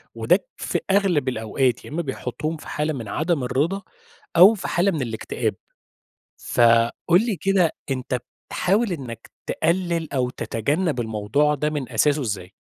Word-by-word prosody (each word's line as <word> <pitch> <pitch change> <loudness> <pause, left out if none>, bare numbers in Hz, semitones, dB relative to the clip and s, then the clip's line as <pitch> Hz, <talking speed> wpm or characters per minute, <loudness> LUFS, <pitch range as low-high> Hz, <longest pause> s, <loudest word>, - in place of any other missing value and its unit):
وده - - +2
في - - -2
أغلب 180 -9 +2
الأوقات، 120 +2 0
يا - - -9
إمّا 160 +4 -2
بيحطُّهم 145 +2 -4
في - - -13
حالة 150 +1 -1
من 115 -6 -6
عدم 155 - 0
الرضا 150 +10 0 0.6
أو 185 +6 +9
في 190 - -5
حالة 190 +3 +2
من 155 - -2
الاكتئاب. 115 -3 -2 0.8
فقُل 120 - +3
لي 215 -6 -1
كده 190 -3 +2 0.2
أنت 130 -1 -1 0.3
بتحاول 200 +3 +1
إنّك 120 -8 -7 0.2
تقلّل 170 -2 0
أو 125 -3 0
تتجنّب 140 - -1
الموضوع 110 +7 +1
ده 150 +1 -1
من 145 -5 -3
أساسه 145 +6 +3
إزاي؟ 100 -5 -4
145 Hz, 145 wpm, -23 LUFS, 120-175 Hz, 0.8 s, أو